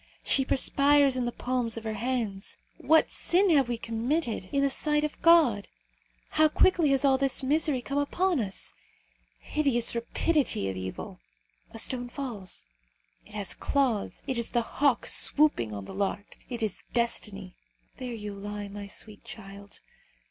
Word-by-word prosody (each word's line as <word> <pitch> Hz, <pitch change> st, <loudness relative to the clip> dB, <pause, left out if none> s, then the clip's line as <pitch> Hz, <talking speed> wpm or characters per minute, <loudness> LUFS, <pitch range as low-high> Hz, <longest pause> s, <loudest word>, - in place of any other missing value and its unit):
She 270 Hz, -, +2 dB
perspires 280 Hz, +1 st, +4 dB
in 250 Hz, -1 st, -1 dB
the 240 Hz, -, -1 dB
palms 245 Hz, -2 st, -2 dB
of 225 Hz, -, -6 dB
her 220 Hz, -1 st, -3 dB
hands. 220 Hz, -3 st, -3 dB, 0.2 s
What 320 Hz, 0 st, +4 dB
sin 375 Hz, +3 st, +2 dB
can 285 Hz, -5 st, +5 dB
we 240 Hz, -, -2 dB
have 230 Hz, -, -13 dB
committed 230 Hz, -, -2 dB
in 280 Hz, 0 st, +1 dB
the 280 Hz, -, +3 dB
sight 300 Hz, +2 st, 0 dB
of 300 Hz, -, -4 dB
God? 310 Hz, -12 st, +5 dB, 0.6 s
How 310 Hz, 0 st, +4 dB
quickly 335 Hz, -1 st, +3 dB
has 275 Hz, 0 st, +3 dB
all 265 Hz, -1 st, +4 dB
this 275 Hz, -1 st, 0 dB
misery 290 Hz, -2 st, +1 dB
come 275 Hz, +3 st, -1 dB
upon 350 Hz, +3 st, +1 dB
us! 195 Hz, -4 st, -3 dB, 0.6 s
Hideous 275 Hz, -6 st, +1 dB
rapidity 240 Hz, -, 0 dB
of 95 Hz, -, -4 dB
evil! 95 Hz, 0 st, -6 dB, 0.5 s
A -, -, -10 dB
stone 245 Hz, +2 st, +1 dB
falls. 235 Hz, -9 st, -5 dB, 0.6 s
It 210 Hz, -, -14 dB
has 205 Hz, -2 st, -2 dB
claws. 260 Hz, -8 st, -1 dB
It 260 Hz, -3 st, -1 dB
is 235 Hz, -, 0 dB
the 240 Hz, -1 st, +1 dB
hawk 275 Hz, +1 st, +1 dB
swooping 290 Hz, -, +3 dB
on 100 Hz, -2 st, -6 dB
the -, -, -9 dB
lark. 200 Hz, +1 st, -3 dB
It 240 Hz, -3 st, -4 dB
is 215 Hz, -, -2 dB
destiny. 205 Hz, -5 st, -1 dB, 0.4 s
There 250 Hz, -1 st, -5 dB
you 210 Hz, -2 st, -6 dB
lie, 205 Hz, +1 st, -6 dB
my 200 Hz, 0 st, -7 dB
sweet 205 Hz, +1 st, -6 dB
child! 200 Hz, -1 st, -10 dB
245 Hz, 165 wpm, -28 LUFS, 205-280 Hz, 0.6 s, can